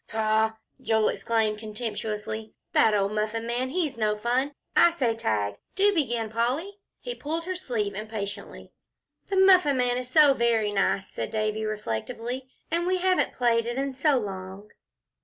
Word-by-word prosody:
"Pshaw!" 220 0 +1 0.3
Joel 220 -1 +2
exclaimed, 220 -2 0
contemptuously, 215 0 -5 0.2
"that 220 -1 +5
old 200 0 +1
Muffin 215 +2 -2
Man, 245 +2 -1
he's 295 -5 -1
no 210 -1 +1
fun. 250 +6 0 0.2
I 345 - +7
say 260 -9 0
'Tag.' 105 - -1 0.2
Do 405 +1 +4
begin, 240 - -1
Polly," 270 - -1 0.2
he - - -5
pulled 325 -3 -4
her 370 - -2
sleeve 235 - -2
impatiently. 205 -1 -6 0.6
"The 395 - -2
Muffin 365 -7 +6
Man 245 0 +1
is 250 0 -7
so 290 +1 +6
very 230 -4 +1
nice," 195 -1 +1
said - - -5
Davie, 215 0 -1
reflectively, 230 - -4 0.2
"and 340 +1 0
we 370 0 +2
haven't 370 0 +1
played 230 -2 +2
it 240 +1 -3
in 275 0 -1
so 275 +1 +2
long." 195 -1 -6
230 Hz, 160 wpm, -26 LUFS, 215-275 Hz, 0.6 s, I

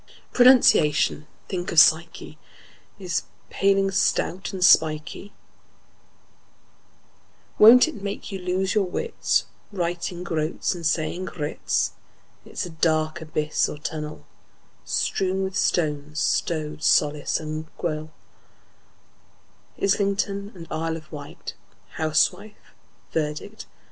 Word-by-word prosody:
Pronunciation—think 180 - +3
of 170 - +5
psyche!— 165 +2 +3 0.6
Is 185 -3 -2
a - - -27
paling, 195 0 +2
stout 190 -1 0
and 185 -2 +1
spikey; 155 +4 +2 2.3
Won't 235 +6 +8
it 225 -11 -7
make 200 +1 -5
you 195 - -5
lose 185 +1 -1
your 210 -3 +2
wits, 465 - -1 0.3
Writing 175 -1 -3
"groats" 160 0 -2
and 175 -2 -8
saying 165 +3 -1
groats? 95 - -2 0.5
It's - - -5
a 175 - -8
dark 155 -1 0
abyss 155 -1 -1
or - - -7
tunnel, 150 0 -6 0.6
Strewn 190 -1 -1
with 190 0 -4
stones, 150 -2 0
like 170 - -1
rowlock, 155 0 0
gunwale, 155 -2 -3 1.7
Islington 200 0 0
and 170 -2 -10
Isle 160 +1 -2
of 155 -1 -15
Wight, 145 -2 -8 0.4
Housewife, 160 +7 -1 0.4
verdict 150 -2 -1
and - - -10
indict! - - -11
170 Hz, 105 wpm, -24 LUFS, 155-195 Hz, 2.3 s, Won't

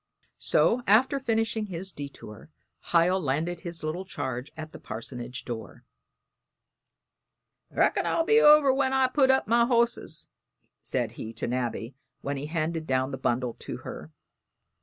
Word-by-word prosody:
So, 245 - +3
after 255 +7 +4
finishing 225 -3 0
his 190 +1 -5
detour, 140 -6 -9 0.4
Hiel 175 +2 +4
landed 165 +4 -1
his 170 -3 -4
little 160 +4 -3
charge 130 -8 -5
at 155 0 -7
the - - -10
parsonage 120 +3 -7
door. 115 -3 -7 1.8
"Reckon - - +1
I'll 330 - +1
be 445 +5 +5
over 300 -3 +7
when 265 0 +1
I've 260 -1 +2
put 270 -3 +4
up 265 -5 +3
my 235 +2 +4
hosses," 235 -1 0 0.3
he - - -44
said - - -1
to 110 +1 -6
Nabby 120 0 -3 0.3
when 140 +1 -3
he 140 +2 -5
handed 160 0 -2
down 130 +1 0
the 135 - -4
bundle 125 -1 0
to - - -6
her. 75 +1 -8
165 Hz, 145 wpm, -27 LUFS, -, 1.8 s, over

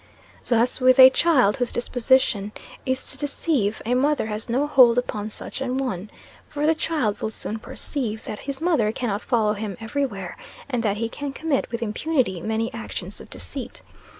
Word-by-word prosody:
Thus, 240 +2 +2
with 255 0 +6
a 260 0 +10
child 260 -9 +3
whose 245 -1 0
disposition 240 -4 +1 0.3
is 260 0 0
to 265 - -8
deceive, 280 -7 0
a 240 - +1
mother 280 +1 +2
has 215 +1 -5
no 260 +5 +2
hold 250 -5 +6
upon 215 -4 -1
such 220 - -6
an 260 -1 -1
one; 210 -7 -3 0.4
for 295 0 -2
the 320 - +5
child 300 -10 -1
will 220 - -1
soon 220 0 -5
perceive 220 -2 -4
that 210 - -6
his 275 -1 -5
mother 310 -11 +2
cannot 220 -3 -2
follow 220 -3 +1
him 205 -3 -5
every 275 +5 -1
where, 195 -6 -7 0.3
and 250 -4 -1
that 210 -2 0
he 230 +1 -1
can 280 +4 -5
commit 305 -2 -1
with 235 0 -2
impunity 230 - 0
many 220 +5 -1
actions - - -5
of - - -13
deceit. - - -6
245 Hz, 180 wpm, -24 LUFS, 215-270 Hz, 0.4 s, a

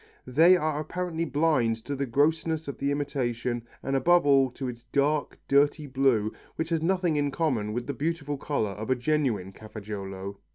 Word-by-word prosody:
They 165 +8 +6
are 155 -3 -1
apparently 165 +1 -3
blind 145 -6 +2
to 145 - -3
the 140 0 -2
grossness 155 +4 +1
of 140 - -6
the 140 - 0
imitation 125 -5 -2 0.2
and 135 - -1
above 175 +5 +4
all 135 -2 +5
to 130 +1 -6
its 120 -1 -7
dark, 140 +4 0
dirty 145 +2 +3
blue 130 -6 +1 0.2
which 160 0 -3
has 165 -2 0
nothing 175 -2 +1
in 145 -1 +1
common 130 -9 -1
with 120 +2 -3
the 140 - -3
beautiful 145 +1 -2
colour 125 -9 -1
of 105 +4 -6
a 130 - +4
genuine 125 -8 0
Cafaggiolo. 100 -2 -7
140 Hz, 175 wpm, -27 LUFS, 120-155 Hz, 0.2 s, They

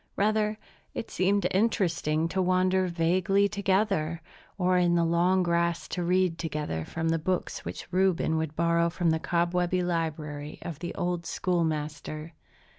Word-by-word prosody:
Rather, 215 +1 +1 0.4
it 225 - -5
seemed 200 +2 +1
interesting 175 -6 +1
to 190 +3 -1
wander 185 +1 +2
vaguely 180 +4 +2
together, 195 -5 0 0.4
or 185 -1 +2
in 175 -1 +3
the 170 - +3
long 175 +3 +3
grass 170 0 0
to 180 - -3
read 180 -1 +1
together 150 - -3
from 160 - -3
the 165 0 +1
books 180 +3 -2
which - - -6
Reuben 185 -3 +2
would 160 -1 -2
borrow 170 0 +2
from 170 -1 +1
the 160 - +1
cobwebby 175 +2 0
library 155 -4 -3
of 165 -4 -6
the 175 0 -5
old 175 -1 -2
schoolmaster. 155 -2 -2
175 Hz, 145 wpm, -28 LUFS, 165-185 Hz, 0.4 s, in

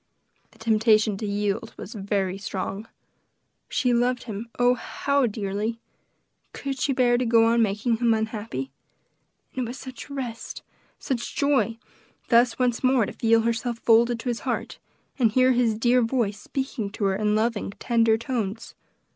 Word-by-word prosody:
The - - -23
temptation 220 -1 +3
to 215 - -4
yield 205 +2 -2
was 215 - -8
very 195 -2 -2
strong. 195 +2 -4 0.8
She 250 -1 +1
loved 245 +1 +1
him, 225 0 -6
oh, 245 0 +4
how 280 +2 0
dearly! 210 +1 -3 0.8
Could 275 -1 -4
she 275 - +1
bear 245 -2 +3
to - - +1
go 225 0 +5
on 230 +1 +3
making 220 +2 +1
him 235 0 +2
unhappy? 220 - -2 0.8
And 255 - -1
it 235 - -4
was 250 - -6
such 260 0 -9
rest 255 -5 -6 0.3
such 245 -3 -4
joy 280 -5 +1 0.5
thus 240 0 +4
once 250 -1 0
more 255 -3 +4
to - - -7
feel 230 0 +3
herself 235 +1 -1
folded 235 +1 +3
to 250 - -3
his 235 - -2
heart, - - -3 0.4
and 225 -4 +3
hear 255 +1 +5
his 240 -3 +2
dear 245 +2 +3
voice 225 -4 0
speaking 265 -6 -4
to - - -4
her 195 -1 +2
in 210 +1 +1
loving, 220 -1 0
tender 230 -2 +2
tones. 225 -3 -4
230 Hz, 160 wpm, -25 LUFS, 215-245 Hz, 0.8 s, go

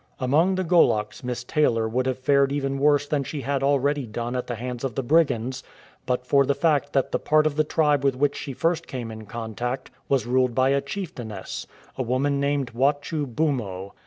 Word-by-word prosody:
Among 155 +9 +2
the 185 - 0
Goloks 140 -11 +2
Miss 125 -1 -3
Taylor 120 -5 +1
would 125 +3 -1
have 130 - -1
fared 140 +1 +3
even 135 -1 -1
worse 145 0 +3
than 145 -1 0
she 145 +1 -5
had 135 +2 -1
already 140 -1 +1
done 120 +3 -4
at 125 - -3
the 120 - -3
hands 125 +1 -5
of 130 -5 -3
the 135 - -1
brigands, 130 -3 +1 0.5
but 125 0 -1
for 140 +2 +4
the 140 +1 +1
fact 145 -3 +1
that 135 -2 +1
the - - 0
part 155 0 +3
of 155 -2 +1
the 155 - +3
tribe 150 -2 +2
with 135 -2 +2
which 145 +2 +1
she 135 - -5
first 165 +4 0
came 120 -4 -5
in 110 -1 -9
contact 120 +3 -4 0.2
was 135 -4 +2
ruled 125 0 +1
by 130 0 +3
a 140 0 +2
chicftainess, 135 - -6 0.3
a - - +2
woman 135 +3 0
named 140 -3 0
Wachu 145 +4 0
Bumo. 115 -9 -2
135 Hz, 205 wpm, -24 LUFS, 125-145 Hz, 0.5 s, for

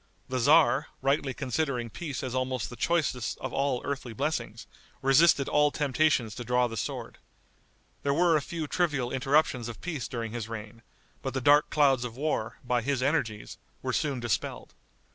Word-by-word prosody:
The 130 0 -1
tzar, 145 +2 +5 0.2
rightly 140 0 +1
considering 130 -3 -2
peace 145 -3 -5
as 130 - -4
almost 130 -5 -2
the - - -7
choicest 140 -6 0
of - - -6
all 135 -2 0
earthly 135 -4 -4
blessings, - - -3 0.4
resisted 140 +1 +5
all 150 0 +4
temptations 140 -5 +1
to 120 - -6
draw 125 +1 +2
the 115 -2 -4
sword. 105 - -5 0.8
There 140 - 0
were 170 +3 +4
a 150 - +2
few 165 +1 -4
trivial 145 -7 0
interruptions 130 -3 +1
of 115 -3 -8
peace 160 -7 -4
during 115 -2 -4
his 115 -1 -5
reign; 110 0 -8 0.4
but 135 -1 -4
the - - +1
dark 145 +3 +5
clouds 135 -4 +3
of 120 -1 -6
war, 145 -6 -2
by 125 -1 +1
his 130 +1 -1
energies, 115 -8 -1 0.2
were - - -1
soon 140 -4 0
dispelled. 120 -4 -3
130 Hz, 170 wpm, -28 LUFS, 120-150 Hz, 0.8 s, tzar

